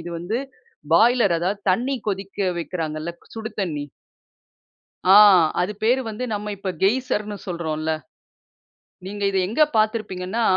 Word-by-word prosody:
"இது 170 +1 -7
வந்து 190 +8 -2 0.5
பாய்லர், 225 0 +5
அதாவது 190 +4 -2
தண்ணீ 250 +8 0
கொதிக்க 195 0 -2
வைக்கிறாங்கல்ல, 160 -1 -4 0.2
சுடு 220 0 -5
தண்ணீ." 150 -6 -3 1.3
ஆ - - +9 0.4
அது 180 +4 0
பெயர் 245 +4 +3
வந்து 220 +4 -5
நம்ம 210 0 -4
இப்ப 190 -1 -4
கெய்சர்ன்னு 210 -1 0
சொல்றோம்ல்ல. 160 -3 -3 1.2
நீங்க 205 +1 -5
இத 195 - 0
எங்க 225 +10 -1 0.2
பாத்திருப்பீங்கன்னா, 215 -1 -1
200 Hz, 120 wpm, -22 LUFS, 175-220 Hz, 1.3 s, ஆ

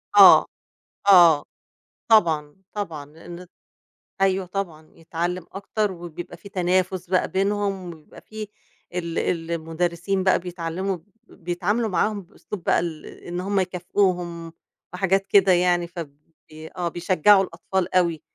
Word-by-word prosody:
آه، - - +9 0.6
آه، 170 -6 +7 0.6
طبعًا، 160 -9 +3 0.2
طبعًا 165 -8 -5
لإن 170 +4 -11 0.8
أيوه 190 -1 +2
طبعًا 175 -5 -5
يتعلّم 170 +2 -4
أكتر، 200 +1 -2
وبيبقى 175 -1 -9
في 200 - -13
تنافس 185 0 0
بقى 185 - +2
بينهم، 195 -1 -1
وبيبقى 155 -2 -16
في 215 -1 -8 0.5
ال 170 -2 -2 0.3
المدرسين 170 +3 -2
بقى 190 - +3
بيتعلّموا 180 +2 -3
ب 165 - -15 0.4
بيتعاملوا 195 +6 -1
معاهم 205 +2 0
بأسلوب 180 +1 -10
بقى - - +3
ال 165 -3 -5
إن 175 0 -7
هُم 195 +2 0
يكافئوهم 180 -2 -1 0.4
وحاجات 195 +1 +1
كده 195 -1 +5
يعني 175 -1 +2
فبي 160 -1 -11
آه 175 -1 -1
بيشجّعوا 185 +3 +4
الأطفال 185 +1 -3
أوي، 170 -4 +2
180 Hz, 120 wpm, -23 LUFS, 170-195 Hz, 0.8 s, آه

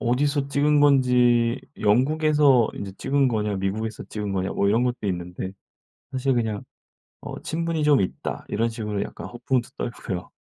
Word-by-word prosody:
어디서 140 +3 +1
찍은 145 +1 +3
건지 125 -3 +4 0.2
"영국에서 135 +2 +4
인제 100 -1 -6
찍은 135 -1 +2
거냐. 105 -3 -1
미국에서 105 +3 -3
찍은 105 -2 -4
거냐." 95 0 -1
뭐 100 - +1
이런 115 +4 +3
것도 120 -4 -2
있는데. 90 0 -4 0.6
사실 135 0 0
그냥 110 -4 -1 0.6
"어 - - -7
친분이 165 -1 -2
좀 145 -3 +5
있다." 95 - -3
이런 115 +2 0
식으로 105 -3 -3
약간 - - -8
허풍도 120 0 -2
떨고요. 100 -6 -5
120 Hz, 330 characters per minute, -24 LUFS, 105-140 Hz, 0.6 s, 좀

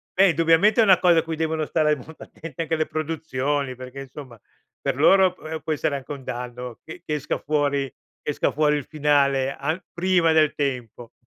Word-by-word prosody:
beh 195 0 +6
indubbiamente 165 +8 +4
è - - +6
una 190 -4 +6
cosa 175 -2 +5
a - - -1
cui 165 0 -4
devono 160 -1 -1
stare 150 -1 +2
molto 155 +4 -12
attente 165 0 -7
anche 160 0 -1
le 155 -1 -1
produzioni, 145 -4 -2
perché 130 +1 -9
insomma 130 -4 -11 0.4
per - - -1
loro 190 -2 +5
p 180 - -18
ehm, 160 0 -4
può 160 - -4
essere 145 -1 -1
anche 135 - -10
un 140 -2 -7
danno 125 -1 -6
che 160 +2 -10
che 150 - -3
esca 150 -1 -2
fuori 145 -2 0 0.3
che 150 - -2
esca - - 0
fuori 150 0 +2
il 145 - -5
finale 140 -3 +1
a 155 +6 -3
prima 175 -2 +2
del 155 -2 +4
tempo. 125 -4 -4
150 Hz, 200 wpm, -23 LUFS, 135-165 Hz, 0.4 s, beh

